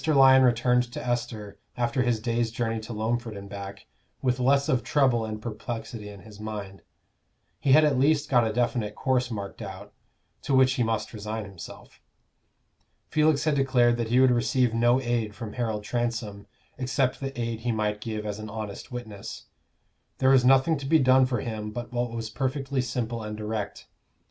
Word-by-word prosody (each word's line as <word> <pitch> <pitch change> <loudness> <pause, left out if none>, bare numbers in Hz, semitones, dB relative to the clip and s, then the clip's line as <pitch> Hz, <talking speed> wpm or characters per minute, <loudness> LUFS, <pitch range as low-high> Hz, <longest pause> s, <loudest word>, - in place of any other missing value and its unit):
Lyon 135 -3 +7
returned 125 0 +3
to - - -5
Esther, 115 -4 -3 0.2
after 125 +2 0
his 120 -3 +1
day's 115 0 0
journey 115 0 -2
to 110 +2 -8
Loamford 115 0 -2
and 100 0 -8
back, 100 0 -8 0.3
with 125 -1 0
less 140 +2 +3
of 125 -2 +2
trouble 125 -3 +2
and 110 -1 -5
perplexity 110 -1 -6
in 100 -1 -11
his 105 -2 -14
mind: 105 -3 -6 0.8
he 135 - +3
had 155 +2 +7
at 140 -4 +2
least 145 +2 +3
got 120 -3 +4
a 110 - 0
definite 115 -2 -1
course 125 -1 0
marked 100 -2 -6
out, 95 -3 -8 0.5
to 140 - 0
which 130 0 +5
he 125 - -1
must 115 -1 -1
resign 110 0 -4
himself. 95 -4 -11 1.1
Felix 155 -1 +3
had 155 -1 +2
declared 130 -3 +3
that 115 -1 -1
he 125 +2 +4
would 130 -1 +6
receive 125 0 +2
no 120 +2 +3
aid 120 -4 -1
from 110 -1 -7
Harold 110 -4 -2
Transome, 115 -3 -3 0.3
except 130 0 0
the 135 -2 -5
aid 115 -1 -2
he 120 +1 -1
might 105 -1 -1
give 110 -1 -4
as 105 0 -4
an 110 0 -7
honest 110 0 -7
witness. 110 -5 -7 0.7
There 130 0 +4
was 130 -2 +5
nothing 135 +4 +4
to 135 - -6
be 160 +3 +5
done 130 -2 +5
for 120 -4 -1
him 110 -2 -4
but 120 +3 -7
what 120 0 0
was 115 -1 -5
perfectly 135 +1 -1
simple 120 -1 -3
and 105 0 -6
direct. 105 -1 -4
120 Hz, 185 wpm, -26 LUFS, 110-130 Hz, 1.1 s, Lyon